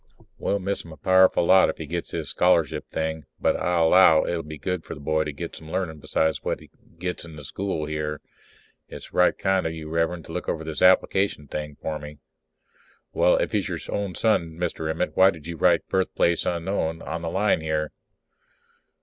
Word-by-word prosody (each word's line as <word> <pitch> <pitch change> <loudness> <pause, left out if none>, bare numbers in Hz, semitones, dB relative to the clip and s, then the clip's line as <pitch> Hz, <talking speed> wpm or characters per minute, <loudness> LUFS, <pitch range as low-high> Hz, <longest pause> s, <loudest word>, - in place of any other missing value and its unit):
We'll 100 - 0
miss 100 +1 -3
him 85 - -12
a 80 - -11
powerful 95 +3 +4
lot 95 +1 +6
if - - -4
he 80 - -6
gets 85 +3 -4
this 80 -4 -4
scholarship 85 -4 +2
thing. 80 -2 -3
But - - +2
I 90 -1 0
'low 80 -1 +6
it'll 85 -1 -1
be 75 -1 -9
good 90 +1 -3
for - - -7
the - - -11
boy 80 +2 0
to 75 - -3
get 85 +4 -7
some 80 - -11
learnin' 90 -5 -2
besides 80 +2 0
what - - -2
he - - -17 0.3
gets 90 +1 -4
in 85 -2 -11
the 75 - -10
school 90 +1 -3
here. 75 -1 -3 0.7
It's - - -11
right 90 - +3
kind 95 -3 +1
of 80 - -4
you, 80 -1 -7
Rev'rend, 85 0 -1
to - - -10
look - - -4
over 80 - -2
this 80 -1 -5
application 95 -3 +3
thing 75 0 -5
for 75 -1 -3
me. 75 0 -10 1.0
_Well, - - +4
if - - -1
he - - +2
is - - -4
your - - -2 0.2
own 100 -3 -3
son, 85 -8 +1
Mr. 80 -2 -2
Emmett, 80 +3 -2
why 95 +1 +7
did 80 -5 -7
you 85 0 -5
write - - +3
'birthplace 90 -2 +1
unknown' 85 -2 -2
on 85 - -4
the 85 - -3
line 95 -1 +1
here? 80 -1 -1
80 Hz, 210 wpm, -25 LUFS, 80-90 Hz, 1.0 s, why